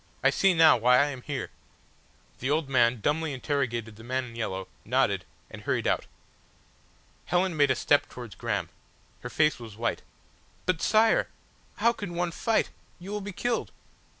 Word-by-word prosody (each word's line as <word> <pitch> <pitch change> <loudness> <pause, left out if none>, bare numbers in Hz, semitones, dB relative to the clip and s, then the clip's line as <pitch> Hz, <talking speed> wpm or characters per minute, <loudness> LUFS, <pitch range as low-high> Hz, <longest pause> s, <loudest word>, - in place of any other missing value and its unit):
I - - +5
see 195 -2 +3
now 160 -4 +7
why 125 +2 +5
I 140 - +5
am 130 -2 -8
here!" 135 -2 -4 0.9
The 130 - -2
old 150 0 +1
man 120 -3 +3
dumbly 155 +4 0
interrogated 120 -5 -2
the 110 - -12
man 130 +2 -2
in 115 -2 -11
yellow 95 -5 -3 0.2
nodded, - - +1 0.3
and - - -9
hurried - - -1
out. - - 0 1.2
Helen 180 -1 +1
made 145 -2 +4
a 130 - +3
step 145 +3 +2
towards 120 -5 -9
Graham. - - -2 0.5
Her 125 - -7
face 150 +2 +2
was 110 -3 -10
white. 115 +1 -1 0.6
"But, 185 -3 0
Sire! 220 +1 +4 0.5
How 235 +3 +3
can 205 -6 -6
one 175 0 -1
fight? 225 +6 0 0.3
You 185 +3 -9
will 210 0 -3
be 205 +1 -6
killed." 240 +5 -2
145 Hz, 170 wpm, -28 LUFS, 120-175 Hz, 1.2 s, now